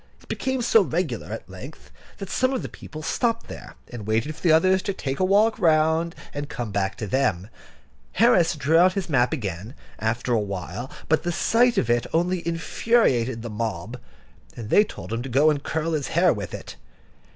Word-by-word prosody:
It - - -22
became 260 -2 -2
so 225 -1 +5
regular 165 - -2
at - - -6
length, - - -11 0.3
that 195 - -7
some 255 +1 +1
of 260 - -2
the - - -5
people 155 0 -10
stopped 230 +6 -1
there, - - -10
and 110 -4 -8
waited 115 +8 0
for - - -16
the 170 - +3
others 185 +4 +4
to 200 - -3
take 135 -7 -4
a - - +2
walk 205 +4 +3
round, 160 0 +2 0.2
and 145 0 -5
come 120 -4 -5
back 100 -1 -1
to 110 - -4
them. 100 -4 0 0.6
Harris 180 -6 +4
drew 150 +3 +3
out 185 +1 +5
his 190 -3 -3
map 125 -4 +2
again, 105 - -5 0.2
after 120 +2 -1
a 115 - +3
while, 100 +4 -5 0.2
but 160 - +2
the 175 - -2
sight 235 +7 +2
of 120 - +2
it 120 0 +1
only 175 +2 +1
infuriated 165 - +1
the 120 - -6
mob, 110 +1 -4 0.6
and 115 -2 -7
they 210 - +6
told 200 - -8
him 115 - -2
to 135 - -6
go 145 +5 +4
and 145 -2 -2
curl 160 +2 -2
his 150 -3 -1
hair 175 0 +3
with 100 -4 -6
it. - - -10
155 Hz, 200 wpm, -24 LUFS, 115-180 Hz, 0.6 s, they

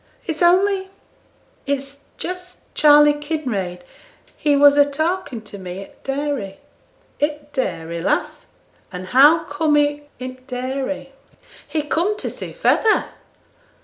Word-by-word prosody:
'It's 325 -1 -4
only 380 +2 +3 0.8
it's 280 0 -3 0.2
just 365 0 -7
Charley 295 0 +6
Kinraid; 255 - -3 0.5
he 295 -1 +2
was 285 0 +7
a 290 - +7
talking 315 -3 -2
to 205 -2 -10
me 185 0 -7
i' - - -11
t' - - -19
dairy.' 270 -8 -3 0.6
'I' 295 - +5
t' 300 - -8 0.2
dairy, 170 - -3
lass! - - -1 0.4
and 180 0 -6
how 295 +6 +6
com'd 295 0 +1
he 290 0 +1 0.2
i' 255 - -5
t' 255 - -16
dairy?' 265 +2 -4 0.6
'He 310 -2 -1
com'd 350 +8 0
to - - -4
see - - -7
feyther. 450 -3 +2
290 Hz, 135 wpm, -21 LUFS, 255-315 Hz, 0.8 s, was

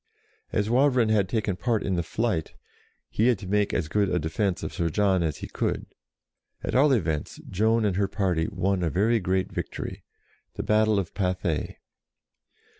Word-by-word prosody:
As 105 -1 0
Wavrin 125 -1 +3
had 100 -4 +2
taken 105 -4 0
part 115 +2 0
in 95 - -1
the 85 - +1
flight, 95 -1 -2 0.6
he 110 - +2
had 125 -3 +3
to 95 - -9
make 105 +1 +1
as 80 - -1
good 100 +4 +1
a 90 - +1
defence 90 +4 -1
of - - -4
Sir 85 -1 0
John 95 +1 +2
as 80 -3 -1
he - - -7
could. - - -2 0.8
At - - -3
all 140 +3 +5
events, 80 - -1
Joan 110 +3 +2
and 95 -3 0
her 100 -1 +2
party 95 -5 0
won 95 -2 0
a 85 - +1
very 110 +7 +2
great 95 0 -1
victory, - - -5 0.5
the - - -3
battle 110 0 +3
of 95 -4 -2
Pathay. 90 -4 -1
100 Hz, 180 wpm, -26 LUFS, 90-110 Hz, 0.8 s, all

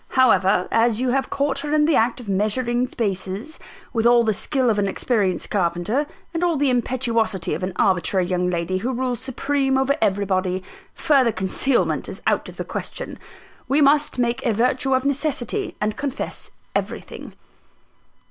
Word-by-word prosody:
However, 190 -7 +4
as 230 -1 +3
you 255 0 0
have 270 +1 0
caught 280 0 0
her 295 +1 -1
in 300 -1 +4
the 315 -2 +3
act 230 +3 +2
of 240 - -10
measuring 240 +5 0
spaces, 200 - -4 0.3
with 225 -1 +2
all 240 0 +5
the 220 -1 +1
skill 255 +4 0
of 210 - 0
an 200 - +1
experienced 195 -2 -1
carpenter, 190 - 0 0.3
and 335 +1 -1
all 340 -3 +2
the 275 -1 +2
impetuosity 230 -7 0
of 160 - -3
an 185 +1 -2
arbitrary 185 0 +2
young 180 0 0
lady 175 +1 -1
who 250 +6 -2
rules 250 -1 -2
supreme 270 +1 0
over 270 +1 +2
everybody, 190 -2 0 0.3
further 275 -7 +3
concealment 205 +7 0
is - - -7
out - - +1
of - - -13
the - - -4
question. - - -6 0.5
We 275 +4 +2
must 295 0 +3
make 245 +1 0
a 235 -5 +1
virtue 255 +4 +1
of 260 +1 -1
necessity, 280 -3 -1
and 210 0 -1
confess 285 -1 -5 0.2
everything." - - -5
240 Hz, 165 wpm, -22 LUFS, 195-270 Hz, 0.5 s, all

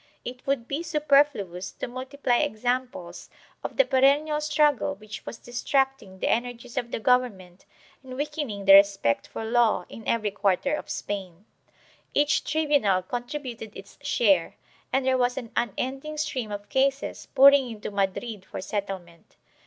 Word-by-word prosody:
* - - -42
It 250 +2 -8
would 265 -4 0
be 280 +4 -2
superfluous 280 - +1
to - - -5
multiply 255 0 -1
examples 255 +1 -2 0.3
of - - -5
the - - +6
perennial 290 - +3
struggle 300 -6 +2
which 210 +1 -10
was - - -6
distracting 255 -4 -1
the - - -2
energies 245 +1 -2
of 245 -3 -2
the - - -3
government 210 -7 0 0.3
and 260 -1 -9
weakening 290 -8 -4
the 195 - +8
respect 195 - +5
for 225 - -6
law 225 -5 +2
in 225 - -10
every 215 -3 +1
quarter 200 +7 +1
of 300 - -4
Spain. 190 -2 -5 0.7
Each 295 +2 +3
tribunal 285 -12 +2
contributed 245 -1 -6
its 195 +1 -13
share, 205 -11 +2 0.4
and 265 0 +1
there 260 -1 +2
was 245 +1 +1
an 240 -4 -6
unending 270 +6 -2
stream 260 -7 -2
of 205 0 -6
cases 270 +1 0
pouring 275 -1 +7
into 215 -2 -6
Madrid 200 +1 -2
for - - -8
settlement. 185 -4 -6
245 Hz, 150 wpm, -26 LUFS, 205-275 Hz, 0.7 s, the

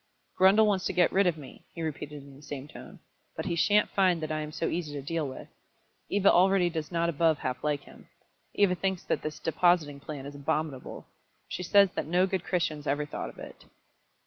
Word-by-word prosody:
"Grundle 195 +4 +6
wants 200 -3 +1
to - - -1
get 180 -1 +3
rid 195 0 +3
of 170 -2 +1
me," 140 -4 -12
he 165 - -4
repeated 150 -2 -5
in 140 -1 -14
the 140 - -15
same 145 -1 -7
tone. 150 - -12 0.4
"But - - -4
he - - -1
shan't 205 +5 +3
find 185 -3 +3
that 155 - -3
I 155 - -1
am 150 0 -6
so 165 +1 -3
easy 165 -4 -3
to 145 - -4
deal 160 +1 -2
with. 130 - -8 0.6
Eva 200 0 +4
already 185 0 +4
does 160 -1 -4
not 170 -1 +1
above 165 -1 +2
half 130 -2 -4
like 150 -2 0
him. - - -16 0.5
Eva 200 -3 +4
thinks 190 0 -2
that - - -1
this 155 0 -5
depositing 160 -3 +1
plan 140 -1 -7
is 140 - -7
abominable. 145 -1 -3 0.4
She - - -5
says 200 +1 +5
that - - -4
no 180 +3 +3
good 190 -2 -2
Christians 155 -5 -2
ever 145 +2 0
thought 150 - -5
of - - -15
it." - - -11
160 Hz, 215 wpm, -28 LUFS, 145-180 Hz, 0.6 s, Grundle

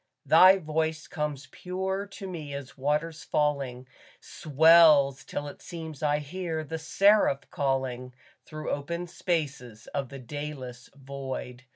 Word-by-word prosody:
Thy 190 +1 +7
voice 160 -1 -2
comes 150 -4 -4
pure 190 +2 -3
to 195 0 -9
me 155 -6 -6
as 140 -2 -8
waters 150 +3 -1
falling, 135 -4 -1 0.3
Swells 155 -3 +5
till 145 - -5
it 145 - -10
seems 160 -4 -8
I 150 -1 +2
hear 160 +2 -4
the 160 +2 -5
Seraph 195 -3 +3
calling 130 -3 -2 0.3
Through 155 -1 -6
open 170 +5 -3
spaces 145 - -3
of 135 -3 -2
the 140 - -8
dayless 130 -2 -7
void. 135 -2 -7
150 Hz, 130 wpm, -28 LUFS, 135-165 Hz, 0.3 s, Thy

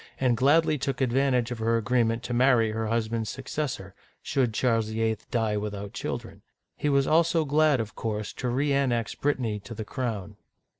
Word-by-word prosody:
and 125 -2 +3
gladly 150 +4 +3
took 135 0 -2
advantage 125 -1 +1
of 120 - -4
her 115 +1 +2
agreement 115 +1 +1
to 125 - -4
marry 120 -3 +4
her 110 0 -2
husband's 115 -1 -1
successor, 135 -4 -3
r 95 0 -14 0.3
should 130 -4 +1
Charles 115 -1 +1
VIII. 110 0 -1
die 110 -4 0
without 100 -1 -5
children. - - -5 0.3
He 150 - -1
was 140 -1 +3
also 165 +1 +3
glad, 150 -1 +3
of 110 -1 -4
course, 105 -2 -3
to 125 - -4
reannex 130 -3 +1
Brit 145 0 +2
tany 110 -5 -2
to 115 +3 -9
the 110 - -5
crown. 105 -6 -4
120 Hz, 180 wpm, -27 LUFS, 110-135 Hz, 0.3 s, marry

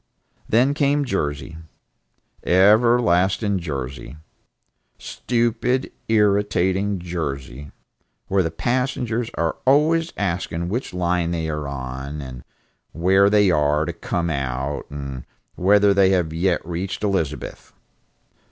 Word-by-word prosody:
Then 125 +5 +3
came 145 0 +1
Jersey, 75 - -3 0.9
everlasting 100 -1 +3
Jersey, 70 -4 -6 0.8
stupid 120 +2 -1 0.2
irritating 100 -2 +1
Jersey, 75 -6 -5 0.6
where 95 0 +2
the 80 - -1
passengers 120 +3 -1
are 85 -1 -1
always 160 +5 +3
asking 85 -3 -2
which 120 +7 -3
line 90 -1 0
they 80 -2 -2
are 75 -2 -3
on, 65 +2 -6
and 65 -3 -8 0.5
where 95 +4 +4
they 105 -2 +4
are 75 -1 +2
to 85 - -4
come 85 0 -2
out, 70 0 -3
and 70 -3 -6 0.3
whether 100 +2 +4
they 100 -1 +4
have 90 -4 +1
yet 90 +1 0
reached 90 +4 -4
Elizabeth. 80 -8 -3
90 Hz, 105 wpm, -22 LUFS, 75-105 Hz, 0.9 s, where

